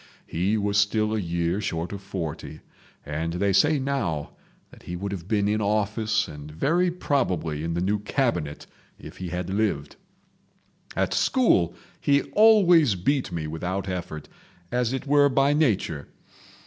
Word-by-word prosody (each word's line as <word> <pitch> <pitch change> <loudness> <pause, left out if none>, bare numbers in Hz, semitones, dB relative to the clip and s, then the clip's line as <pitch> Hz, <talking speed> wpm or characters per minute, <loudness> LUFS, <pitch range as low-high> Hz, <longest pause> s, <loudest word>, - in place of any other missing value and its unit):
He 95 +6 0
was 100 0 +1
still 105 +1 +1
a 110 - 0
year 85 +1 -1
short 85 -3 -3
of 100 - -6
forty, 85 -5 -6 0.4
and 80 +3 -3
they 100 +3 +1
say 150 +10 +4
now 130 - -2 0.4
that - - -16
he 90 - -6
would 100 +3 -4
have 90 -3 -6
been 105 -2 +1
in 105 +1 +1
office 105 +1 0
and 75 0 -9
very 165 - +1
probably 90 - -1
in 85 0 -2
the 85 - -1
new 100 +3 +1
Cabinet 100 - -1 0.3
if - - -12
he 90 -1 -5
had 90 +1 -4
lived. 95 -9 -1 1.0
At - - 0
school 160 - +2 0.2
he 140 0 +2
always 180 - +6
beat 130 +6 0
me 85 -3 -3
without 90 +5 -3
effort—as 90 +5 -5
it 130 +1 -3
were 145 0 +4
by 135 +2 +3
nature. 105 - 0
100 Hz, 150 wpm, -25 LUFS, 85-125 Hz, 1.0 s, always